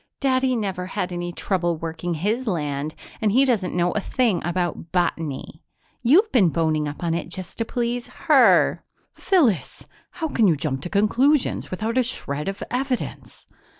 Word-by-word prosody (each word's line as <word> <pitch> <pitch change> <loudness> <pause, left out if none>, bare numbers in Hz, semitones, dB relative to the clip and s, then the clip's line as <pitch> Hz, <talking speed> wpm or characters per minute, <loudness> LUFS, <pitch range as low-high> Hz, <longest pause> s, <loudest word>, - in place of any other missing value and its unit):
"Daddy 260 -1 +2
never 190 -5 -3
had 185 -2 -3
any 175 0 -3
trouble 175 -2 -1
working 165 +2 -4
his 215 +10 -1
land 150 -4 -2 0.3
and 215 -2 +2
he 260 +6 +4
doesn't 210 -10 0
know 175 0 +2
a - - -1
thing 230 -4 +1
about 175 -2 -2
botany. 165 -4 -2 0.4
You've 345 - +4
been 205 -9 +4
boning 155 -2 0
up 145 +4 -7
on 165 -1 0
it 170 0 -3
just 180 +3 -9
to 230 - 0
please 240 +1 -2 0.2
her!" - - +5 0.3
"Phyllis! 240 - +1 0.3
How 330 -3 -3
can 230 -8 +2
you 170 - +4
jump 135 -2 -2
to 175 - -5
conclusions 245 +9 +2
without 220 +6 -1
a - - +4
shred 150 - -2
of 195 0 -4
evidence?" 255 0 -3
185 Hz, 165 wpm, -23 LUFS, 165-245 Hz, 0.4 s, her